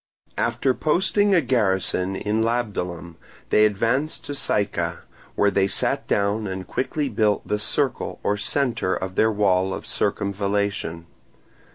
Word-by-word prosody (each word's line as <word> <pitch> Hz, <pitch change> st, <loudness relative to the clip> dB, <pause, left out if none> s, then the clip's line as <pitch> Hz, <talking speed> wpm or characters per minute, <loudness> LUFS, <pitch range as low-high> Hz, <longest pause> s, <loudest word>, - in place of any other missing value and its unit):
After 120 Hz, +3 st, +1 dB
posting 190 Hz, +7 st, +2 dB
a 170 Hz, -, +5 dB
garrison 95 Hz, -6 st, +1 dB
in 105 Hz, +3 st, -1 dB
Labdalum, 90 Hz, -8 st, -2 dB, 0.3 s
they 105 Hz, 0 st, +6 dB
advanced 115 Hz, +9 st, -1 dB
to 145 Hz, -, -5 dB
Syca, 105 Hz, -7 st, -1 dB, 0.3 s
where 100 Hz, 0 st, +3 dB
they 95 Hz, -1 st, +2 dB
sat -, -, 0 dB
down 100 Hz, +1 st, 0 dB
and 95 Hz, -1 st, -5 dB
quickly 145 Hz, -, -2 dB
built 105 Hz, -4 st, 0 dB
the 105 Hz, -, 0 dB
Circle 130 Hz, +4 st, -1 dB
or 105 Hz, -, +1 dB
centre 110 Hz, -3 st, 0 dB
of 95 Hz, +1 st, -4 dB
their 110 Hz, +4 st, +3 dB
wall 95 Hz, -2 st, +2 dB
of -, -, -8 dB
circumvallation. 100 Hz, -4 st, -1 dB
105 Hz, 135 wpm, -23 LUFS, 95-120 Hz, 0.3 s, they